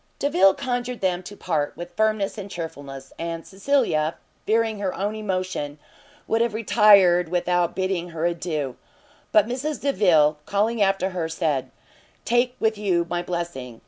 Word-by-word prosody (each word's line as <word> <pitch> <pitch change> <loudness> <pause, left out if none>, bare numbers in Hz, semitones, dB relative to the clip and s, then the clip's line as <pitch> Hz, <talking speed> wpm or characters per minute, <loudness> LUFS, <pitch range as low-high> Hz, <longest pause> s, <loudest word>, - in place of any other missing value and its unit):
Delvile 195 -9 +4
conjured 245 -1 -3
them 180 -2 0
to 200 +3 -10
part 150 -5 -2
with 175 +1 -8
firmness 215 -1 +1
and 200 -2 -7
chearfulness, 140 -6 -7
and 165 0 -4
Cecilia, 195 - 0 0.3
fearing 220 -1 +1
her 195 -2 -2
own 205 +2 -2
emotion, 185 -8 -3 0.5
would 225 - +1
have 230 -2 0
retired 200 -6 +5
without 175 0 0
bidding 185 -2 -1
her 165 0 -3
adieu. 160 -6 -2 0.5
But 210 -2 +5
Mrs 265 +6 -3
Delvile, 160 - +3
calling 215 +3 0
after 195 -1 +2
her, 170 -3 -3
said, 155 -5 -1 0.6
"Take 245 +1 +2
with 220 -1 +1
you 180 -5 +1
my 175 0 0
blessing!" 170 -10 -5
185 Hz, 145 wpm, -24 LUFS, 170-215 Hz, 0.6 s, retired